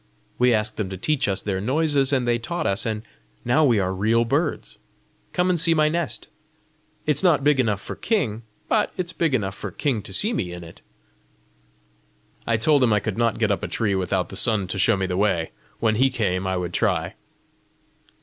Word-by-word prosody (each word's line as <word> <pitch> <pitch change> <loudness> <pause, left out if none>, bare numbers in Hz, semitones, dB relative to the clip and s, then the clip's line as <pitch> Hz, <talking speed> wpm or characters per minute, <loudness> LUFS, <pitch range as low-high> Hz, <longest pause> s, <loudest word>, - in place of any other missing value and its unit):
We 125 0 +4
asked 110 -1 0
them 105 -4 -2
to 95 - -6
teach 150 +8 0
us 95 -1 -1
their 95 -2 -2
noises, 140 +3 +1
and 130 -3 +1
they 120 0 +2
taught 170 +7 -4
us, 100 +4 0
and 110 -1 -3 0.4
now 120 +6 +3
we 120 -6 +4
are 95 -1 0
real 110 +5 +2
birds! 145 +6 -2 0.5
Come 180 0 +1
and 175 -3 +1
see 165 -1 +3
my 155 -1 +3
nest. 155 -8 -3 0.8
It's 150 -1 +2
not 160 -7 +3
big 145 -1 +3
enough 105 -6 +1
for - - -7
king, 135 - -1 0.3
but - - +1
it's 180 -1 -3
big 160 -5 +1
enough 95 -5 -1
for - - -6
king 130 -8 -1
to 95 - -11
see 210 - 0
me 90 - -3
in 90 0 -8
it!" 85 0 -13 1.7
I 115 - +2
told 140 +4 +3
him 120 - +3
I 105 - +3
could 110 +1 -4
not 115 -2 +1
get 110 -2 +1
up 100 - -1
a - - -3
tree 105 -4 -1
without 95 -1 -1
the - - -8
sun 105 -1 +2
to 95 - -3
show 100 +3 +3
me 95 - -1
the 90 -1 -2
way; 95 -5 +1 0.3
when 110 -1 +2
he 135 +3 +4
came, 95 -7 -1
I 95 0 -1
would 90 -1 -4
try. 90 -7 0
115 Hz, 210 wpm, -23 LUFS, 95-145 Hz, 1.7 s, We